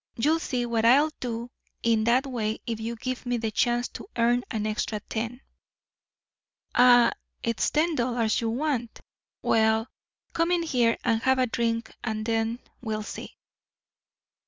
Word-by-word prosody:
You'll 305 +7 +2
see 250 -6 -2
what 230 -2 0
I'll 280 +7 +5
do 235 0 -4 0.3
in 225 -2 +2
that 250 +4 +3
way 225 -5 -2
if 230 -2 -3
you 230 +1 -3
give 255 +2 -4
me 245 0 +1
the 225 -1 -2
chance 240 +3 +1
to - - -9
earn 240 +1 +3
an 215 -1 -2
extra 215 0 -2
ten." 230 +4 -4 1.3
"Ah, 245 -1 +6 0.3
it's 230 -1 +1
ten 320 +3 +2
dollars 235 -4 0
you 230 - 0
want. 245 -2 -2 0.4
Well, 220 +1 +2 0.4
come 335 0 +1
in 350 -1 +2
here 245 -7 +2
and 225 -2 +1
have 260 +2 +3
a 255 - +3
drink 230 -1 -1
and 215 -2 -2
then 225 0 0 0.2
we'll 215 -3 -3
see." - - -8
235 Hz, 155 wpm, -27 LUFS, 225-250 Hz, 1.3 s, Ah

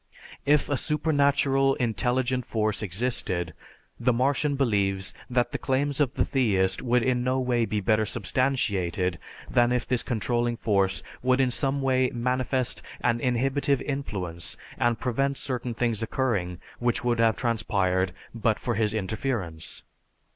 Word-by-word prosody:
If 150 0 +4
a 145 - 0
supernatural, 140 -2 +2
intelligent 125 +2 0
force 110 -3 -1
existed, 95 -4 -1 0.5
the 125 - +3
Martian 140 +4 +1
believes 100 -7 +1 0.2
that 120 -1 +1
the - - -3
claims 140 +2 0
of 140 -3 +1
the - - +2
theist 100 -8 +1
could 125 -1 +2
in 125 -1 +1
no 130 +1 +1
way 125 -2 +1
be 105 -1 -2
better 110 +2 +2
substantiated 95 -7 0 0.3
than 120 0 +3
if 125 -1 0
this 125 -2 +2
controlling 120 0 -1
force 100 -4 +1 0.2
would 130 +1 +2
in 130 -2 +3
some 135 +2 0
way 130 -1 +2
manifest 125 +1 0 0.2
an 120 -1 +1
inhibitive 135 +3 +1
influence 95 - -3 0.2
and 120 -2 +2
prevent 135 +2 0
certain 125 -2 -3
things 115 -2 0
occurring 105 -7 -1 0.2
which 120 0 0
would 120 -1 +1
have 115 -1 +4
transpired 100 -6 0 0.2
but 115 -2 +1
for 120 - -2
his 110 0 0
interference. 100 -6 -3
120 Hz, 140 wpm, -26 LUFS, 105-130 Hz, 0.5 s, If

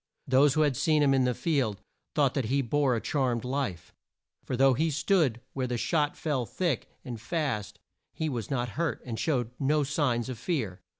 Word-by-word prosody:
Those 135 +2 +4
who 155 - +3
had 145 -3 +3
seen 155 +3 +3
him 140 -1 +4
in 130 -1 +3
the 125 -1 +1
field 130 - 0 0.4
thought 140 -4 +3
that 135 -5 -1
he 135 +5 +1
bore 135 +1 +2
a - - 0
charmed 130 -6 0
life, 125 -10 -3 0.5
for 125 - -3
though 135 +1 +5
he 160 +6 +1
stood 155 - +1
where 130 -2 -1
the 120 -1 -2
shot 150 +3 0
fell 145 -6 -1
thick 170 -9 -1 0.2
and 120 -4 -6
fast 135 - -2 0.3
he 160 - -3
was 120 -7 -3
not 125 -3 -1
hurt, 165 +8 -2
and 115 -3 -4
showed 125 -7 0
no 150 +2 +2
signs 135 -5 0
of 125 -4 -6
fear. 115 - -2
135 Hz, 195 wpm, -28 LUFS, 120-150 Hz, 0.5 s, though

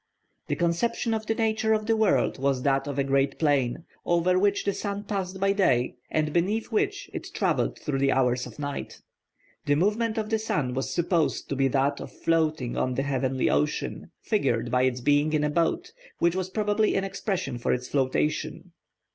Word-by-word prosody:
The - - 0
conception 225 +7 0
of 220 -1 -3
the 225 - +1
nature 220 -1 +1
of 215 -1 0
the 225 0 +2
world 215 -9 +2
was 135 -1 0
that 135 0 +1
of 140 -1 -4
a 140 - +2
great 135 0 +1
plain, 145 -1 +1 0.2
over 175 +2 +2
which 200 +1 +1
the 200 - +1
sun 200 0 -4
passed 190 -2 -3
by 195 +1 +2
day, 125 -12 +2 0.2
and 155 -1 0
beneath 205 +8 0
which 400 - 0
it - - -5
travelled - - 0
through 140 -3 -2
the 135 0 +3
hours 125 -1 +1
of - - -13
night. 145 -1 -5 0.6
The 145 - +4
movement 215 +7 +1
of 215 0 -2
the 220 - +2
sun 150 - -1
was 135 +1 -2
supposed 170 -2 0
to 140 - -1
be 135 0 +2
that 140 +2 +1
of - - -8
floating 155 -6 0
on 130 -1 0
the 135 - 0
heavenly 130 -2 0
ocean, 75 +1 -1
figured 120 - 0
by 125 +1 +3
its 125 -1 -1
being 145 +4 +2
in 150 -1 +2
a 150 - +1
boat, 165 +1 0 0.3
which 170 +1 +2
was 185 -1 -2
probably 210 +1 +1
an 195 - +1
expression 190 - -3
for - - 0
its 125 0 -1
flotation. 150 +5 -1
155 Hz, 195 wpm, -26 LUFS, 135-200 Hz, 0.6 s, The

